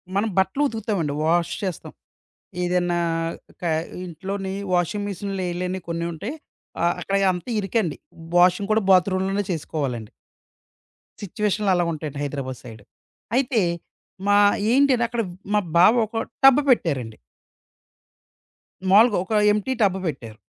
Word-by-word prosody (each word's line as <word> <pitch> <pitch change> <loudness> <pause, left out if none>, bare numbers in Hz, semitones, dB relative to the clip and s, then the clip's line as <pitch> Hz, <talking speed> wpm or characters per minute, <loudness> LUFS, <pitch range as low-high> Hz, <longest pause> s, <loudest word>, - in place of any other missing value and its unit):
మనం 210 +3 +1
బట్టలు 190 +10 +2
ఉతుకుతామండి. 205 - -2
వాష్ 170 +1 +1
చేస్తాం. 185 -4 -4 0.7
ఏదన్నా 175 -1 0 0.6
కా 170 - 0 0.4
ఇంట్లోని 190 +3 -5 0.2
వాషింగ్ 190 +4 0
మెషిన్‌లో 195 0 -4
ఎయలేనియి 180 +1 -4
కొన్ని 170 0 -2
ఉంటాయి. 205 - -5 0.5
ఆహ్, 170 0 +2
అక్కడ 195 - -1 0.2
అంతా 180 +7 -6
ఇరుకండి. 195 -4 -1 0.4
వాషింగ్ 180 +3 +3
కూడా 220 - +2
బాత్‌రూమ్ 185 0 +4
లోనే 200 +1 -1
చేసుకోవాలండి. 135 -8 -4 1.1
సిచ్యుయేషన్లు 210 0 0
అలాగుంటాయండి 155 -4 -2
హైదరాబాద్ 135 -3 -4
సైడ్. 115 -4 -11 0.5
అయితే 255 -4 +2 0.7
మా 205 0 +5 0.3
ఏంటిని 265 -2 +4
అక్కడ 235 0 -2 0.3
మా 210 - +4 0.2
బావొక 220 +4 +4 0.3
టబ్ 270 +1 +8
పెట్టారండి. 135 - +1 1.7
మాములుగా 215 +2 +6
ఒక 220 - -4 0.2
ఎంప్టీ 210 +5 -1
టబ్ 190 -2 +3
పెట్టారు. 115 -8 -6
190 Hz, 115 wpm, -23 LUFS, 170-210 Hz, 1.7 s, టబ్